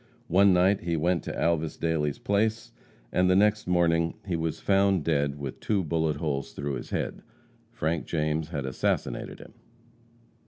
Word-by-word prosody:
One 100 +2 +5
night 95 +2 +4
he 85 -1 -1
went 85 +2 +1
to - - -4
Alvas 80 -2 0
Dailey's 80 -3 -1
place, 110 +3 0 0.4
and 90 0 +2
the 90 - +4
next 105 +1 +3
morning 85 -2 +2
he 90 -3 -1
was 80 -1 -2
found 95 -3 +2
dead 70 -3 0
with 70 -2 -6
two 100 -3 0
bullet 80 -1 0
holes 70 -3 -3
through 70 0 -3
his 65 - -6
head. - - -3 0.5
Frank 80 0 -2
James 75 -1 -1
had 70 -5 -3
assassinated 65 - -2
him. - - -14
85 Hz, 160 wpm, -27 LUFS, 75-95 Hz, 0.5 s, One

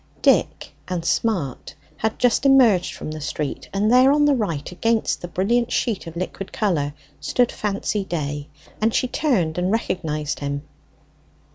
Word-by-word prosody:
Dick - - +2 0.2
and 180 -3 -3
Smart 170 - -1 0.2
had 220 0 -1
just 245 +1 +2
emerged 250 -10 +4
from - - -6
the 155 0 -6
street, 150 0 -4
and 205 +3 +1
there 255 +2 +7
on 295 +1 +4
the 290 - +4
right, 170 - -2
against 225 +5 0
the 175 - -5
brilliant 230 +7 0
sheet 210 -7 -1
of 165 - -8
liquid 185 +2 -5
colour, 150 -9 0 0.2
stood 245 -1 +1
Fancy 205 0 -2
Day; 145 -5 -4 0.3
and 220 +1 +2
she 255 - +2
turned 190 - 0
and 180 +2 0
recognized 155 -9 -2
him. 140 0 -3
190 Hz, 155 wpm, -22 LUFS, 160-230 Hz, 0.3 s, there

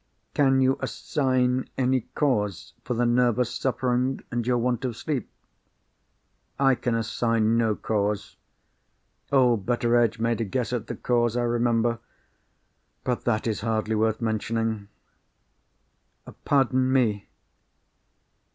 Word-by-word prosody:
"Can 135 -2 +3
you 130 +1 +3
assign 130 -2 0
any 130 0 +2
cause 105 - -1
for 125 - -3
the 120 +1 +1
nervous 120 0 +2
suffering, 130 0 0
and 120 -1 -2
your 125 -1 +2
want 120 +1 -1
of 120 -4 -3
sleep?" 140 -4 -3 1.3
"I 135 -1 +5
can 120 -1 -1
assign 115 0 +1
no 115 -2 +2
cause. 105 -1 -2 1.0
Old 125 -7 +3
Betteredge 120 -1 +2
made 115 0 0
a - - +2
guess 120 +4 -2
at 120 -3 -3
the - - -4
cause, 120 -1 +1
I 120 - +1
remember. 120 -1 +1 1.0
But 125 -2 -2
that 110 -2 0
is 110 -3 -1
hardly 110 0 -1
worth 110 +1 +1
mentioning." 110 -1 -1 1.6
"Pardon 130 -2 +2
me. 110 -6 +1
120 Hz, 120 wpm, -25 LUFS, 110-125 Hz, 1.6 s, I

